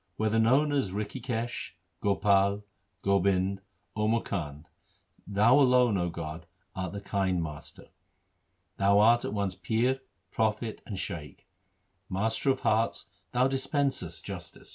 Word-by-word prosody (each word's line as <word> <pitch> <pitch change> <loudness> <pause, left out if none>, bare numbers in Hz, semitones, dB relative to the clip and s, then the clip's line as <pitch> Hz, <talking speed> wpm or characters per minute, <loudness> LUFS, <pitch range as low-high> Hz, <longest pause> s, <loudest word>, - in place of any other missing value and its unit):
Whether 110 0 +1
known 135 +7 +4
as 140 -8 +1
Rikhikesh, 115 +4 -4 0.3
Gopal, 100 0 +2 0.4
Gobind, 100 0 +2 0.3
Or 105 0 0
Mukand, 75 -10 -2 0.6
2 100 - -8
Thou 115 +7 +5
alone, 125 -4 +5
0 90 -3 0
God, 80 0 -7 0.3
art 95 -1 -4
the 100 - -5
kind 95 -2 0
Master. 75 -2 -9 0.9
Thou 100 +1 +4
art 115 +3 +5
at - - -3
once 100 -2 -1
Pir, 125 +4 0 0.3
Prophet, 110 0 -1
and 100 - -5
Shaikh; 85 0 -6 0.6
Master 110 +8 0
of 130 -1 +1
hearts, 110 +2 +1 0.3
Thou 125 +1 +3
dispensest 135 - -1
justice. - - -7
1 - - -17
Suhi. - - -12
105 Hz, 135 wpm, -29 LUFS, 95-120 Hz, 0.9 s, Thou